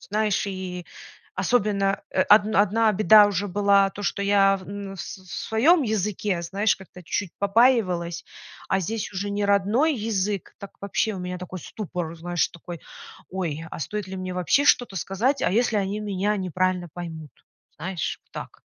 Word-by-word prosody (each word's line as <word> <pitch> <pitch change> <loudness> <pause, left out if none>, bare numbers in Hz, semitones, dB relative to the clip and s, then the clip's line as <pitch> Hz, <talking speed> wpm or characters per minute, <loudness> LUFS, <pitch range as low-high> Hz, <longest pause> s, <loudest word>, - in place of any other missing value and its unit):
Знаешь, 210 0 0
и 185 -2 -5 0.5
особенно, 200 -4 +1
э, 185 - +2
одн 210 +2 +5
одна 215 +2 +4
беда 210 +1 +7
уже 205 0 -1
была 200 0 +3
то, 205 - -8
что 200 - -1
я 195 -1 +4
в 185 -2 -12
н 200 -1 -6
с - - -5
с 185 -2 -17 0.2
своём 290 +10 +4
языке, 210 -4 -1
знаешь, 200 +5 +1
как-то 185 -1 -13
чуть 190 +2 -2
побаивалась, 195 -6 +2 0.4
а 190 - +2
здесь 215 +4 -3
уже 200 +1 -3
не 205 0 -1
родной 205 +10 +3
язык, 210 -4 -2
так 200 - -9
вообще 200 +2 0
у - - -6
меня 180 0 -4
такой 180 0 -7
ступор, 175 -3 -5
знаешь, 175 +1 0
такой: 170 0 -9 0.5
ой, 165 -4 -3
а - - -6
стоит 205 +5 -4
ли 190 - -6
мне 185 -1 -4
вообще 180 - +2
что-то 245 -8 +3
сказать? 215 - 0
А - - +2
если 230 +1 +2
они 200 +1 -1
меня 205 0 -1
неправильно 185 -1 -1
поймут? 160 -4 -7 0.5
Знаешь, 175 -3 -4
так. - - -8
195 Hz, 165 wpm, -25 LUFS, 180-210 Hz, 0.5 s, беда